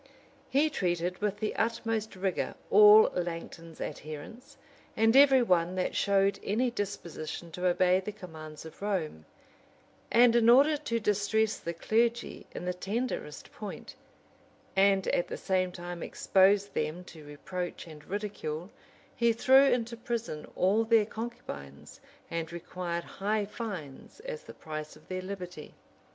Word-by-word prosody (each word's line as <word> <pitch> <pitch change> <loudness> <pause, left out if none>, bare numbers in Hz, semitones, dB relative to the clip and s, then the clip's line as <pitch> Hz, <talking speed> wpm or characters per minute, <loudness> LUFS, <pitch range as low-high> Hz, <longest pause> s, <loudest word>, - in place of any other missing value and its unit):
170] 275 - +3
He 310 - +2
treated 180 -6 -1
with 205 -1 0
the 215 0 -2
utmost 225 -2 -1
rigor 190 -1 -2 0.2
all 210 +1 +8
Langton's 165 -1 -5
adherents, 155 - -8 0.4
and 225 +2 +4
every 270 -2 +7
one 180 -4 +2
that 185 - -1
showed 200 0 +2
any 240 +5 0
disposition 175 -6 -5
to 180 +3 -1
obey 180 +1 +3
the 195 +2 -5
commands 160 -6 -10
of 160 - -12
Rome: 170 - -2 0.9
and 240 0 +6
in 235 -1 +5
order 280 +5 +6
to 260 -6 -2
distress 210 +1 +1
the 170 0 -5
clergy 230 +6 0
in - - -7
the 180 - -1
tenderest 195 -3 -4
point, 210 +4 -8 0.8
and 195 0 +4
at 175 - +1
the - - -5
same 185 -1 0
time 175 -1 -7
expose 195 +1 +3
them 155 +4 -3
to 160 -3 -13
reproach 175 +5 -6
and 155 -3 -12
ridicule, 195 -4 -4 0.4
he 235 -2 +3
threw 265 +4 +6
into 240 -3 +1
prison 235 - -5
all 200 +5 +3
their 225 -1 +4
concubines, 140 - -8 0.3
and 165 -1 -3
required 170 0 -4
high 210 +1 -2
fines 195 - -7
as - - -7
the - - -11
price 155 -1 -7
of 155 0 -20
their 185 0 -3
liberty. 180 -4 -8
195 Hz, 140 wpm, -30 LUFS, 170-225 Hz, 0.9 s, all